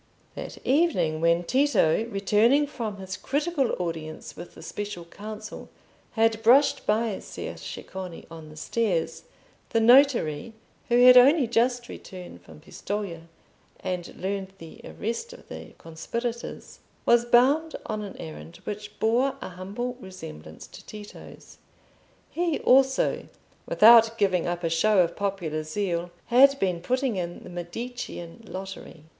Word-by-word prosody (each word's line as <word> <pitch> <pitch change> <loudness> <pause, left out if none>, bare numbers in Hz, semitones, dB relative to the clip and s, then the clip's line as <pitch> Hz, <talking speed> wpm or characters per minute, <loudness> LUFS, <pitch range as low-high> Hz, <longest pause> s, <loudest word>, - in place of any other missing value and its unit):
That - - -7
evening 260 - +2
when 170 +1 +3
Tito, 225 - +2
returning 225 +6 +3
from 230 -7 -5
his 190 -1 -6
critical 285 - -1
audience 160 -3 -5
with 175 - -10
the - - -12
Special 205 -4 -6
Council, 215 +4 -9 0.4
had 225 -1 +2
brushed 255 +6 +4
by 215 -1 +1
Ser - - -7
Ceccone 185 -3 -8
on 160 -2 -10
the 155 - -13
stairs, 165 -4 -1 0.4
the 225 - +2
notary, 230 - +4 0.4
who 245 +1 +5
had 250 0 +10
only 275 +3 +7
just 240 +1 +1
returned 180 - -10
from 80 -3 -15
Pistoja, 185 -5 -5 0.5
and 180 -2 -4
learned 190 0 -4
the 165 -3 -12
arrest 235 - -5
of 485 - -15
the - - -9
conspirators, 235 +9 -6 0.3
was 235 0 +5
bound 270 +7 +3
on 215 -1 -3
an 200 -2 -8
errand 75 +1 -9
which 210 0 -7
bore 245 +5 +2
a - - -7
humble 205 +8 -5
resemblance 80 - -10
to - - -13
Tito's. 210 -1 -12 0.7
He 340 -3 0
also, 265 +1 +3 0.4
without 225 0 +7
giving 185 -5 +1
up 175 0 -3
a - - +1
show 205 +6 +3
of 170 0 -4
popular 185 -6 -2
zeal, 170 +1 -2 0.2
had 275 +3 +6
been 180 -7 -1
putting 255 +2 0
in 175 -1 -5
the - - -10
Medicean 175 +1 -7
lottery. 190 -4 -8
210 Hz, 135 wpm, -26 LUFS, 175-240 Hz, 0.7 s, had